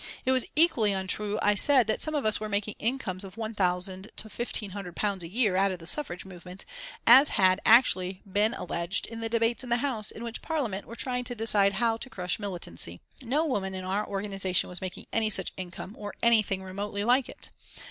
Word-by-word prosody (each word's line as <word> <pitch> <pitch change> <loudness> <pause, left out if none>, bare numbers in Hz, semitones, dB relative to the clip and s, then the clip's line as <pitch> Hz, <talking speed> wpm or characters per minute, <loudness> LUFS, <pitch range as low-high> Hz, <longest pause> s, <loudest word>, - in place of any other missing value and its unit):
It 260 - +3
was 260 -2 +2
equally 295 -11 +3
untrue, 205 +2 0
I 205 - +4
said, 255 +4 +5
that 215 - -1
some 310 -1 +1
of 285 - -1
us 215 - +5
were 215 0 -5
making 205 0 -1
incomes 220 -6 -2
of 190 -1 -10
£1,000 190 -3 -1
to 220 - -7
£1,500 200 -3 -3
a 165 - -3
year 210 +1 +1
out 195 +1 +3
of 185 - -4
the 165 - -13
suffrage 180 - +1
movement, 180 0 -10 0.4
as 265 +5 +8
had 185 0 +4
actually 190 -6 +4
been 205 +4 +1
alleged 170 +1 -2
in 230 0 -8
the 225 0 -3
debates 230 +2 +1
in 250 - -8
the 235 - +3
House 240 -5 -1
in 230 - -4
which 235 -1 -5
members - - -21
of - - -16
Parliament 250 -12 -2
were 230 - -9
trying 250 0 -2
to 245 - -4
decide 210 -3 +2
how 230 0 +1
to 260 - -6
crush 180 -4 -3
militancy. 170 - -4 0.2
No 275 +6 0
woman 195 -10 -2
in 185 - -5
our 200 +3 -1
organisation 195 -2 0
was 180 -1 -6
making 185 -1 -6
any 225 -1 +2
such 190 -3 +1
income, 185 +1 -7
or 205 -1 -7
anything 215 -5 +3
remotely 200 +2 -4
like 250 +3 +2
it. - - -9
205 Hz, 210 wpm, -28 LUFS, 190-235 Hz, 0.4 s, as